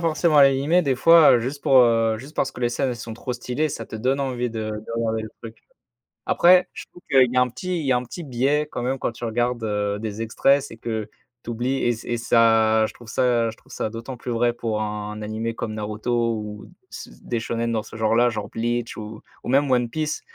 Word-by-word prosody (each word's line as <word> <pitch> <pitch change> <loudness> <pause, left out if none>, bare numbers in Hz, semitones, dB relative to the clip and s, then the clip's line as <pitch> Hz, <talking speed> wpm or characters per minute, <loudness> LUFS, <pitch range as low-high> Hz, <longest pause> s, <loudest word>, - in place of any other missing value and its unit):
forcément 160 -2 +3
l'animé, 140 +5 +4
des 140 -6 +1
fois, 165 +4 +7
heu, 120 - +4
juste 135 +4 -5
pour, 135 - +4
heu, 115 -1 +2
juste 135 +7 -11
parce 135 - 0
que - - -11
les 120 - +2
scènes, 135 +2 -1
elles 125 - -3
sont 115 0 -7
trop 125 +2 -5
stylées, 125 +5 -2
ça 145 - -5
te - - -11
donne 130 +5 0
envie 125 -2 -2
de 110 -1 -4
de 105 +2 -7
regarder 110 -1 -1
le 110 - -6
truc. 115 0 -10 0.7
Après, 180 +1 +5
je - - -9
trouve 175 - -16
qu'il 130 -2 +6
y - - -4
a 125 - +5
un 125 - +2
petit 180 +8 -4
il - - -5
y 135 - +1
a 125 - +4
un 125 - -3
petit 170 +8 -8
bais 140 +3 0
quand 125 - -4
même 130 +2 -1
quand - - -1
tu 120 +1 -7
regardes, 120 +1 -1
heu, 105 -1 -1
des 110 0 -5
extraits, 135 +5 +2
c'est 125 -5 -10
que 110 -2 -4 0.3
tu - - -8
oublies 120 +3 -1
et - - +2 0.2
et - - +1
ça 110 -1 +4
je - - -6
trouve 120 -2 -14
ça 120 -2 +1
je 110 - -10
trouve, - - -21
ça, - - -2
d'autant 115 +4 -7
plus 120 0 -6
vrai 120 +1 +1
pour 110 -2 -3
un 105 0 -4
animé 110 +2 -3
comme 110 -1 -5
Naruto 115 +2 -1
ou 105 -1 -8 0.2
c - - -9
des 120 - -3
shōnens 115 +1 -2
dans 110 - -1
ce 110 - -11
genre-là, 115 +2 +3
genre 105 -3 -5
Bleach 120 +1 -2
ou 110 0 -8 0.2
ou - - -6
même 140 +2 +3
One 125 -2 +2
Piece, 155 +4 -3
120 Hz, 245 wpm, -23 LUFS, 110-130 Hz, 0.7 s, fois